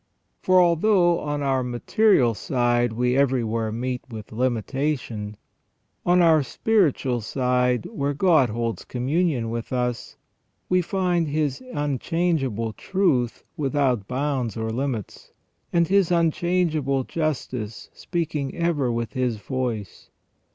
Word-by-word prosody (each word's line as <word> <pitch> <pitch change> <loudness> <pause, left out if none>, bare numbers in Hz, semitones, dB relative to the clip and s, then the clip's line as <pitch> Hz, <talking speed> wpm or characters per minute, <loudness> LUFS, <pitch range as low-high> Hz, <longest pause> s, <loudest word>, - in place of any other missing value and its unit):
For 185 0 +4
although 175 0 +4
on 145 -1 -3
our 135 -1 +1
material 125 - +2
side 120 0 +1
we 125 +2 0
everywhere 115 -5 +1
meet 125 +2 -3
with 110 -3 -9
limitation, 120 -2 -2 0.7
on 180 0 +5
our 160 -2 +5
spiritual 140 - +1
side, 125 0 0
where 140 0 -2
God 155 -6 +4
holds 115 +1 -3
communion 130 -2 -1
with 115 0 -5
us, 125 -2 -2 0.5
we 185 0 +3
find 180 -2 0
His 145 -2 -1
unchangeable 140 - -1
truth 140 - 0
without 135 - 0
bounds 130 -4 -2
or 110 0 -2
limits, 125 -3 -4 0.4
and 170 -1 +3
His 195 -1 +3
unchangeable 165 -5 +1
justice 125 -8 -4
speaking 155 -6 -3
ever 160 -7 0
with 115 -2 -3
His 125 -3 -1
voice. 120 -3 -4
135 Hz, 115 wpm, -24 LUFS, 120-165 Hz, 0.7 s, on